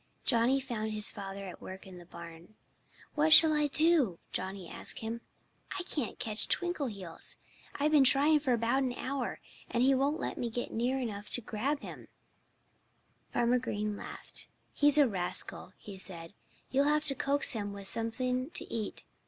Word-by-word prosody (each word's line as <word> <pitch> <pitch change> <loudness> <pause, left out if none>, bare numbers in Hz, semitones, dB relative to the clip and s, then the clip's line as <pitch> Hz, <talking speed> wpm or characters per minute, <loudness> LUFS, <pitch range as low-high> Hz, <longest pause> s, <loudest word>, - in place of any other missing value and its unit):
Johnnie 240 +2 +2
found 225 -5 -4
his 210 0 +4
father 195 -1 -8
at 185 - -10
work 190 +1 -10
in 185 -2 -12
the 175 - -15
barn. 170 +3 -12 0.6
"What 310 +1 +1
shall 315 0 +8
I 300 -1 +1
do?" 300 - +3
Johnnie 190 -1 -4
asked - - -2
him. 225 +1 -5 0.6
"I - - -3
can't 290 - -2
catch 215 -1 +1
Twinkleheels. 235 - -1 0.4
I've 295 +2 0
been 295 -3 +5
trying 285 +4 +5
for 280 -3 -2
about 235 +3 +1
an 255 -2 -1
hour. 260 0 -4 0.3
And 240 - 0
he 270 +1 +4
won't 280 +4 0
let - - -4
me 240 - -2
get 240 +2 -4
near 245 +4 -1
enough 210 -4 -5
to 245 - +2
him - - -28
to - - -13
grab 275 +7 -1
him." - - -10 1.2
Farmer 240 +1 +1
Green 210 -3 -3
laughed. - - -6 0.3
"He's 290 0 +5
a 290 -2 +6
rascal," 185 -5 0
he 195 -2 -11
said. 170 -2 -6 0.4
"You'll 275 +2 +2
have 300 +1 +2
to 295 -2 +5
coax 280 +2 +3
him 205 -3 -3
with 200 -1 -7
something 250 +5 +1
to - - -2
eat. 220 -2 -5
240 Hz, 175 wpm, -30 LUFS, 205-280 Hz, 1.2 s, shall